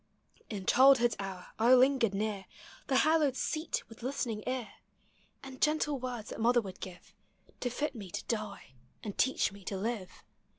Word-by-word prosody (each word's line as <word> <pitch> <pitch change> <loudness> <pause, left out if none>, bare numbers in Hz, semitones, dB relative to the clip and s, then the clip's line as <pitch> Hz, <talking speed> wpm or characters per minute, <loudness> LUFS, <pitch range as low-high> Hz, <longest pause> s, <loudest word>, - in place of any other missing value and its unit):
in 200 -4 -5
childhood's 250 -2 +6
hour 190 -2 -6
I 240 +3 +7
lingered 255 -5 +4
near 205 -1 -2 0.4
The 270 - +1
hallowed 310 -4 +3
seat 315 +4 -2
with 225 -1 -14
listening 240 -4 -2
ear; 255 -3 -2 0.7
And 265 -1 -10
gentle 300 -2 +2
words 245 -4 -5
that - - -6
mother 240 +2 +5
would 195 -5 -7
give 180 -1 -10 0.5
To 245 - -1
fit 290 +5 -2
me 205 -6 -8
to - - -5
die, 210 - -4 0.3
and 205 -3 -5
teach 265 -5 +2
me 200 0 -13
to 195 - -3
live. 210 -2 -4
235 Hz, 165 wpm, -32 LUFS, 205-265 Hz, 0.7 s, I